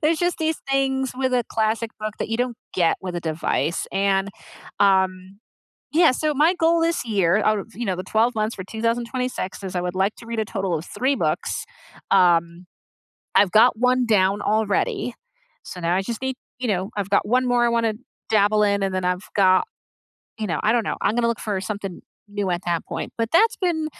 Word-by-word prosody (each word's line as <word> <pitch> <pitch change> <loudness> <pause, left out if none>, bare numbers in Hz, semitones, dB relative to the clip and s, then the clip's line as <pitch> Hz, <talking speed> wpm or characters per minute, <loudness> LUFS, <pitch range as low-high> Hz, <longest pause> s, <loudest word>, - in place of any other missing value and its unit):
There's 315 +1 +2
just 350 +1 0
these 320 0 0
things 265 -1 +1
with 260 -1 0
a 245 -2 +2
classic 225 +1 0
book 215 0 -4
that - - -3
you 225 - -1
don't 245 -1 -1 0.2
get 170 -3 +2
with 180 -2 -5
a - - -2
device 160 0 -1
and, 195 0 +1 0.5
um, 190 0 +2 0.5
yeah, 330 -1 +5
so, 300 +3 -1
my 315 +6 +4
goal 330 -1 +2
this 335 -3 +1
year 195 -5 +2
out 215 0 +3
of, 205 +3 -7
you 240 - -5
know, 190 -4 -1
the 185 - -5
12 225 +2 +1
months 215 +1 -1
for 185 - -7
2026 230 -1 -3
is 190 -1 -5
I 180 - 0
would 180 +1 -3
like 195 +3 +1
to 230 - -13
read 230 -1 -4
a 220 - 0
total 195 -5 -2
of 160 - -8
3 270 +2 0
books, - - -2 0.5
um, 175 -1 +3 0.7
I've 195 -3 +5
got 220 +1 +5
one 250 0 +3
down 200 -2 +2
already, 215 +3 0 0.5
so 180 - -8
now 170 +1 0
I 190 - +1
just 230 +4 -5
need, 265 0 -2 0.2
you 255 - -2
know, 190 -2 -1
I've 200 -1 -2
got 200 - +2
one 250 +4 +2
more 245 -1 +3
I 235 - +3
wanna 230 -1 +1 0.4
dabble 210 0 +3
in 200 -1 +1
and 195 - -1
then 185 -1 -1
I've 180 +2 -2
got, 185 -2 +4 0.8
you 215 - -2
know, 165 - -1
I 215 - +4
don't 240 - +2
know - - -3
I'm 210 - +1
gonna 235 0 +1
look 235 - -1
for 205 -3 -2
something 195 -2 -5 0.3
new 205 -2 -3
at 175 +1 -1
that 170 -1 -1
point, - - -5
but 230 -1 -1
that's 445 +7 +5
been, 335 -4 0
215 Hz, 215 wpm, -23 LUFS, 190-245 Hz, 0.8 s, yeah